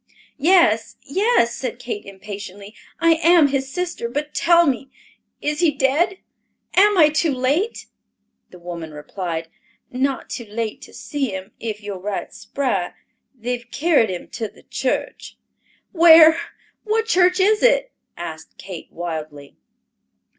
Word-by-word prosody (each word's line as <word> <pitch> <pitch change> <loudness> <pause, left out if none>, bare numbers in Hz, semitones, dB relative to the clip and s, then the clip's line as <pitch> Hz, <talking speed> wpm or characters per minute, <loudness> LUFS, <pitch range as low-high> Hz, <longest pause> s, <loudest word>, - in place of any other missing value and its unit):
"Yes, 270 - +3
yes," 380 - +2
said 250 -3 -4
Kate 235 -5 -6
impatiently, 200 +1 -9 0.3
"I 335 0 +4
am 335 -4 +5
his 270 -1 -2
sister. 350 -9 -3
But 295 +4 -4
tell 340 0 +4
me, 270 -1 -1 0.5
is 300 0 -1
he 340 - +4
dead? 295 +7 +1 0.6
Am 410 +1 +5
I 310 -3 +7
too 310 +1 +1
late?" 280 - -1 0.6
The 180 - -14
woman 170 -3 -8
replied, 165 +2 -5 0.4
"Not 265 +1 -1
too 235 - -5
late 215 +1 -4
to - - -13
see 285 -4 -3
him, 190 0 -8
if 215 -2 -5
you're 200 -2 -6
right 200 +1 -4
spry. 200 -11 -2 0.4
They've 245 0 -5
carried 295 -7 +2
him 180 -2 -5
to 225 - -4
the - - -20
church." - - -3 0.5
"Where? 325 -2 +8 0.5
What 445 +1 0
church 365 -3 +3
is 420 +3 +3
it?" - - +3 0.3
asked 160 -2 -8
Kate 185 -3 -9
wildly. 155 -4 -6
260 Hz, 135 wpm, -21 LUFS, 200-335 Hz, 0.6 s, Where